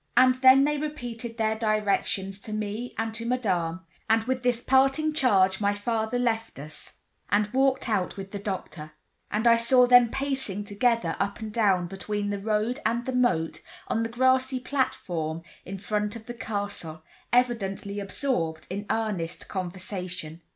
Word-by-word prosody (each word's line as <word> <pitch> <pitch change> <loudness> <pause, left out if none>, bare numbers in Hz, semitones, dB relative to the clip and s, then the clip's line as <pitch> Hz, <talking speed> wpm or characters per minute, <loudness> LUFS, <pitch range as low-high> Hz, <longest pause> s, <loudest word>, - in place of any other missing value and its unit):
And 255 0 +7
then 260 +1 +6
they 295 0 +1
repeated 245 -6 -5
their 220 -1 +1
directions 210 -2 0
to 215 - -8
me 215 +3 -4
and 225 0 -2
to 230 +1 -4
Madame, 185 -8 -1 0.3
and 225 0 +4
with 255 +2 -1
this 245 -1 +1
parting 270 +5 +3
charge 195 -9 +3
my 205 0 +2
father 220 +2 -1
left 225 -2 -1
us, 150 +2 -9 0.4
and 210 +1 +1
walked 265 0 +2
out 200 -4 -1
with 195 0 -7
the 200 - -4
doctor; 180 -6 -5 0.4
and 215 +3 -1
I 230 0 +7
saw 250 +2 +5
them 245 -1 +7
pacing 265 -7 -2
together 205 -3 +1
up 200 +2 -1
and 215 -2 -6
down 195 -6 +3
between 205 +3 -3
the 200 - -2
road 215 +5 0
and 235 +2 0
the 260 - -2
moat, 240 -11 +1 0.3
on 225 - +1
the 230 - -1
grassy 260 +2 +2
platform 170 - -2 0.2
in 195 +1 -6
front 210 +2 -2
of 225 -1 -9
the 240 - -6
castle, 200 -8 -5 0.3
evidently 205 -5 0
absorbed 185 - -1
in 205 +2 -4
earnest 210 -7 -2
conversation. 180 -3 -4
220 Hz, 160 wpm, -27 LUFS, 195-245 Hz, 0.4 s, And